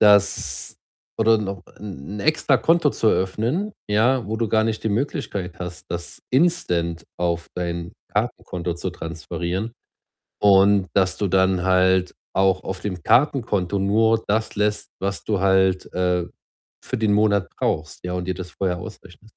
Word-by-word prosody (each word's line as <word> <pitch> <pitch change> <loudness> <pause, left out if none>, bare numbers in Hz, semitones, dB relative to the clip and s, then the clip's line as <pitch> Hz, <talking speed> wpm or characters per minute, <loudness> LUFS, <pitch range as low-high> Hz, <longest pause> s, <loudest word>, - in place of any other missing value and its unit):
dass 100 -2 +3 0.4
oder 110 0 +4
noch 100 -3 -4 0.2
'n 100 -1 -7
'n - - -4
Extrakonto 155 +2 +3
zu 115 - -1
eröffnen, 115 - 0 0.2
ja, 115 +4 +2
wo 110 +2 -2
du 115 0 -1
gar 110 +1 +3
nicht 110 -1 -2
die - - +2
Möglichkeit 100 -6 -2
hast, 90 +1 -7
das 85 0 -6
instant 90 - +1
auf 85 -1 -1
dein 85 -1 -3 0.2
Kartenkonto 85 -1 -2
zu 90 +2 -4
transferieren 85 +5 -4 0.7
und, 100 -1 +5
dass 95 -1 +2
du 100 - 0
dann 95 -1 +2
halt 95 0 +3 0.2
auch 95 -1 +3
auf 95 0 -4
dem 90 -4 -4
Kartenkonto 110 - +2
nur 110 +3 +3
das 110 +2 0
lässt, 105 0 0
was 95 -3 -2
du 105 -3 0
halt, 95 -1 +2
äh, 90 -1 +1 0.6
für - - -2
den 110 -2 +2
Monat 100 -2 +3
brauchst, 80 +2 -2
ja, 90 - -3
und 90 -1 -3
dir 95 - -1
das 90 0 -7
vorher 90 -2 -1
ausrechnest. 90 +4 -12
95 Hz, 150 wpm, -23 LUFS, 90-110 Hz, 0.7 s, und